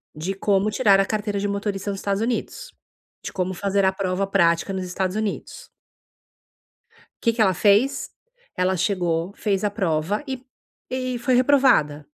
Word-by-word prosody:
de 170 +6 -3
como 195 +1 +1
tirar 200 -1 +4
a 195 - +3
carteira 210 -1 -2
de 205 - -1
motorista 200 0 -3
nos 195 - -5
Estados 200 +1 -1
Unidos. 250 - -3 0.5
De - - -5
como 185 0 -2
fazer 200 +1 0
a 190 - +4
prova 190 0 -1
prática 170 -1 +2
nos 190 -1 -3
Estados 185 +1 -2
Unidos. 215 -2 -4 1.5
Que 230 - +3
que 230 - +2
ela 190 -3 +4
fez? 215 +9 +2 0.5
Ela 185 +1 +1
chegou, 175 -1 -1
fez 200 -2 -1
a 205 - +1
prova 190 - -1
e 265 -2 -5 0.5
e 255 -1 -2
foi 255 +1 +1
reprovada. 250 - +3
200 Hz, 160 wpm, -23 LUFS, 185-215 Hz, 1.5 s, tirar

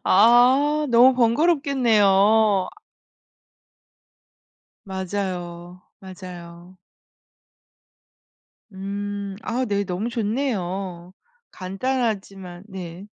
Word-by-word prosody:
아 255 +8 +4
너무 245 +2 +6
번거롭겠네요. 225 - +3
아 - - -21 2.1
맞아요, 180 -2 -5 0.2
맞아요. 180 -1 -11 1.9
음 200 0 -5
아 250 +3 -2
네, 200 -3 -1
너무 195 +4 -4
좋네요. 195 -7 -3 0.4
간단하지만 195 -3 -4
네. 185 -2 -9
200 Hz, 135 characters per minute, -22 LUFS, 185-235 Hz, 2.1 s, 너무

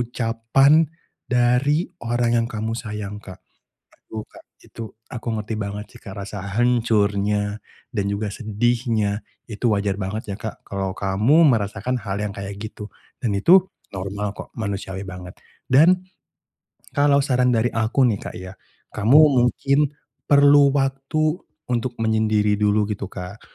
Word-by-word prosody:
ucapan 120 +6 +3 0.4
dari 125 +7 +2 0.2
orang 120 0 +1
yang - - -3
kamu 110 +1 -3
sayang, 105 -3 -5
Kak. 95 -2 -11 0.5
Aduh, 110 -1 -9
Kak, - - -18 0.2
itu 110 -2 -9 0.2
aku 120 - -7
ngerti 110 +1 -4
banget 105 +1 -4
sih, 120 - -14
Kak, 95 -2 -10
rasa 100 0 -7 0.2
hancurnya 105 -3 +1 0.3
dan 100 -4 -1
juga 100 0 -2
sedihnya 110 -1 0 0.2
itu 115 +1 -2
wajar 100 0 -1
banget 100 +3 -3
ya, 95 - -5
Kak, 110 - -7
kalau 95 -1 -4
kamu 105 +12 +3
merasakan 110 +3 -1
hal 95 -1 -4
yang 105 -1 -3
kayak 100 0 -7
gitu 105 0 -8 0.3
dan 110 -6 0
itu 180 - +6 0.3
normal 100 +2 -4
kok, - - -9
manusiawi 100 -2 -4
banget 90 -1 -9 0.3
dan 175 +8 +5 0.9
kalau 145 0 +4
saran 125 -3 +2
dari 120 0 +2
aku 115 +4 +2
nih, 110 -5 +1
Kak, - - -7
ya. 95 +1 -8 0.4
Kamu 115 +8 +5 0.2
mungkin 140 +4 +2 0.4
perlu 145 0 +6
waktu 140 +4 0 0.3
untuk 120 0 -2
menyendiri 110 -2 +2
dulu 105 0 +2
gitu, 100 -2 -5
Kak, 90 +4 -8
110 Hz, 140 wpm, -22 LUFS, 100-125 Hz, 0.9 s, itu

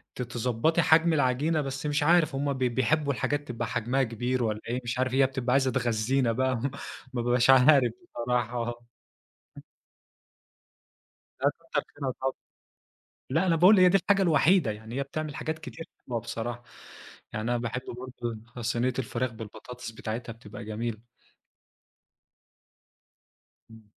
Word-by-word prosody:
ت - - -5
تضبّطي 125 +6 +1
حجم 165 +1 +4
العجينة، 145 +3 +2
بس 135 0 -5
مش 145 0 +1
عارف 160 -2 +4
هُم 140 +1 0
بي 130 -2 0
بيحبوا 140 +4 +1
الحاجات 145 +4 -2
تبقى 120 -1 -3
حجمها 125 +3 0
كبير 125 +2 -1
والّا 110 -1 -1
إيه، 120 +2 -1
مش 120 +1 -3
عارف، 130 0 0
هي 135 +1 +5
بتبقى 130 -1 -2
عايزة 135 -1 +3
تغذينا 120 0 +1
بقى 130 +2 +1 0.6
ما 120 - -1
بابقاش 120 +1 +2
عارف 130 -1 +7 0.2
بصراحة 120 0 -2 2.6
لأ - - +4 0.2
كتر - - +1
خيرها 135 -3 -3
طبعًا، 135 0 0 1.0
لأ 160 +8 +1
أنا 170 - +4
باقول 185 +5 +7
هي 180 0 +7
دي 195 - +5
الحاجة 195 +2 +2
الوحيدة، 165 - +4
يعني 110 +3 -8
هي 140 - 0
بتعمل 150 +1 -5
حاجات 155 0 -3
كتير 160 +1 -8 0.2
حلوة 120 -2 -1
بصراحة. 120 +2 -5 0.7
يعني 110 +2 -2
أنا 120 - +2
باحب 120 +2 -3 0.2
برضه 120 -3 -6 0.2
صينية 120 +2 0
الفراخ 125 0 -2
بالبطاطس 115 +2 -9
بتاعتها 115 +1 -5
بتبقى 110 -2 -10
جميلة. 110 +1 -4 2.7
إمم. 110 -1 -15
125 Hz, 140 wpm, -28 LUFS, 120-145 Hz, 2.7 s, عارف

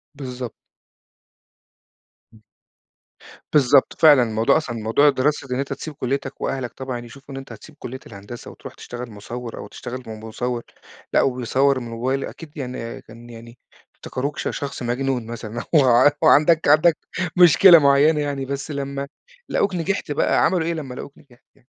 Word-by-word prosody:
بالضبط. 125 -3 -6 1.8
إمم. 110 - -19 1.1
بالضبط 140 -2 +4
فعلًا، 145 -5 +7
الموضوع 110 +2 +2
أصلًا 130 -7 -4
موضوع 115 +6 +2
الدراسة 145 +1 +1
ده 125 - -4
إن 130 - -2
أنت 140 0 -2
تسيب 150 +3 -7
كليتك 135 0 -4
وأهلك 130 -3 -3
طبعًا 130 -2 -5
يشوفوا 135 +4 -12
إن - - -6
أنت 135 - -12
هتسيب 155 - -12
كلية 130 +2 -7
الهندسة 100 +5 -10
وترُوح - - -11
تشتغل 120 -1 -8
مصوّر 115 +3 -8
أو - - -7
تشتغل 125 +3 -8
م 110 -1 -7
مصوّر، 120 +2 -3 0.5
لأ - - +5
وبيصوّر 130 +2 +1
من 120 - -7
الموبايل، 125 +4 -2
أكيد 160 -1 -11
يعني 125 -4 -6
كان 115 +2 -14
يعني، 115 +1 -12 0.4
افتكروك 140 +3 -5
ش - - -3
شخص 140 -2 -5
مجنون 125 0 -1
مثلًا 115 0 -6
أو - - +8 0.4
أو - - +6
عندك 155 +2 +5
عندك 155 +3 +5 0.4
مشكلة 175 0 +8
معينة 145 +2 +4
يعني، 140 -2 -3
بس 140 +3 -5
لمّا 140 -1 -4 0.4
لقوك 200 -2 0
نجحت 180 -1 -2
بقى، 145 - +2
عملوا 175 -4 +1
إيه 170 - 0
لمّا 140 -6 -6
لقوك 140 - -9
نجحت 125 -4 -22
يعني؟ - - -29
135 Hz, 160 wpm, -22 LUFS, 120-145 Hz, 1.8 s, أو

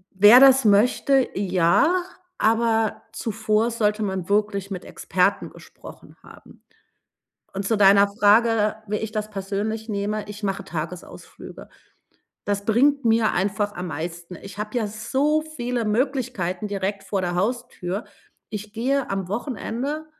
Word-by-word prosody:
wer 210 +6 +8
das 265 -1 +7
möchte, 245 +5 +3
ja, 195 - +2 0.4
aber 225 -1 +1
zuvor 220 0 -1
sollte 215 -2 0
man 190 -3 -3
wirklich 200 -1 0
mit 185 -2 -6
Experten 185 +2 -1
gesprochen - - -14
haben. - - -17 0.9
Und 195 0 -4
zu 225 - +1
deiner 200 0 +6
Frage, 210 +1 +3
wie 210 - -1
ich 220 0 -5
das 215 -1 -3
persönlich 210 +3 -4
nehme, 210 0 -3
ich 205 +1 -9
mache 195 0 -2
Tagesausflüge. 170 0 -8 0.8
Das 200 0 -2
bringt 275 +6 +2
mir 225 -1 +3
einfach 205 +2 -1
am 180 -2 -6
meisten. 170 +2 -6
Ich 195 +3 -12
habe 210 +3 -4
ja 225 -3 0
so 265 +9 0
viele 250 -6 -4
Möglichkeiten 220 -5 -1
direkt 200 0 -3
vor 195 - -2
der 175 -1 -2
Haustür. 210 -1 -3 0.5
Ich 210 0 -7
gehe 260 +4 -1
am 195 -2 -3
Wochenende, 255 +6 -4
210 Hz, 135 wpm, -23 LUFS, 195-235 Hz, 0.9 s, wer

